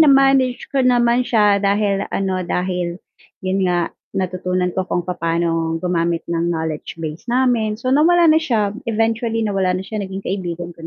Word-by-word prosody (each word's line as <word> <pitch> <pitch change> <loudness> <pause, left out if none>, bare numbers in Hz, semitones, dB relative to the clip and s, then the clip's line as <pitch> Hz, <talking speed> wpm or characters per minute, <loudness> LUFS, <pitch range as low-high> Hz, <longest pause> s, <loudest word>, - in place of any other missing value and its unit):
na-manage 270 -4 +4
ko 275 - +2
naman 245 -1 +3
siya, 210 -5 +3
dahil 200 0 +1
ano, 190 -1 -1
dahil 180 -1 -2 0.5
yun 190 0 +1
nga 175 -1 0 0.2
natutunan 185 -1 -1
ko 190 0 -2
kung 175 - -1
papa'no 165 -2 -1
gumamit 170 -1 -1
ng 170 0 -1
knowledge 160 -2 -3
base 160 +6 -7
namin, 240 -4 +1
so, 255 +3 -2
nawala 340 +4 +5
na 315 - +4
siya, 220 -10 0 0.2
eventually 225 0 0
nawala 190 -3 0
na 185 - -5
siya 215 +2 -4
naging 195 0 -6
kaibigan 175 -2 -4
ko 170 - -18
195 Hz, 160 wpm, -19 LUFS, 175-230 Hz, 0.5 s, nawala